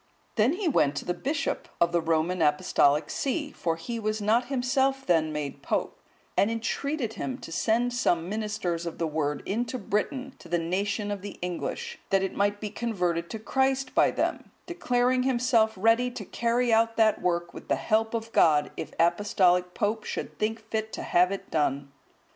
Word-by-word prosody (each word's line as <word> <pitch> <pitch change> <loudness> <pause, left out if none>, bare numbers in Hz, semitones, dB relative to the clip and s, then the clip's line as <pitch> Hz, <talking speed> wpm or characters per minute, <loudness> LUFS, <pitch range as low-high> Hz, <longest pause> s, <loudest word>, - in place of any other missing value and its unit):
Then 230 +6 +3
he 380 0 -2
went 145 - +3
to - - -4
the 175 - 0
bishop 280 - -2
of 170 0 +3
the 170 -1 +2
Roman 165 +2 0
Apostolic 150 0 +3
see(161) 290 +2 -2
(for 165 -1 -1
he 230 +8 -5
was 215 0 -1
not 220 +4 +2
himself 270 +1 0
then 160 -3 +2
made 145 -2 -4
pope), - - -2 0.4
and 200 - +3
entreated 230 +2 -2
him 255 +2 -4
to 165 - -10
send 235 +7 +1
some 175 -9 +1
ministers 200 -5 -2
of 170 - -5
the 165 - -1
Word 150 -2 -2
into 235 +5 -2
Britain 255 +5 -2
to 170 - -14
the 175 - +2
nation 200 +5 -1
of 200 -2 -4
the 205 - -8
English, 470 - -4
that 195 -1 +3
it 195 - -2
might 205 +1 +1
be 210 -1 -5
converted 180 -7 -1
to 225 - -4
Christ 265 +3 0
by - - +5
them; - - -2 0.2
declaring 255 -7 +1
himself 240 -3 +2
ready 225 +5 +3
to 230 -4 -7
carry 235 +3 +1
out 225 0 +3
that 220 -1 +3
work 175 -1 -1
with - - -10
the - - +2
help 220 +1 +1
of 225 0 -4
God, 150 -7 +4
if 155 - -5
the 165 - +3
Apostolic 180 -1 +2
Pope 215 +1 0
should - - -5
think 220 +1 -2
fit 220 0 -2
to - - -4
have 180 +2 +3
it 195 - -6
done. 140 -2 0
215 Hz, 190 wpm, -27 LUFS, 175-245 Hz, 0.4 s, by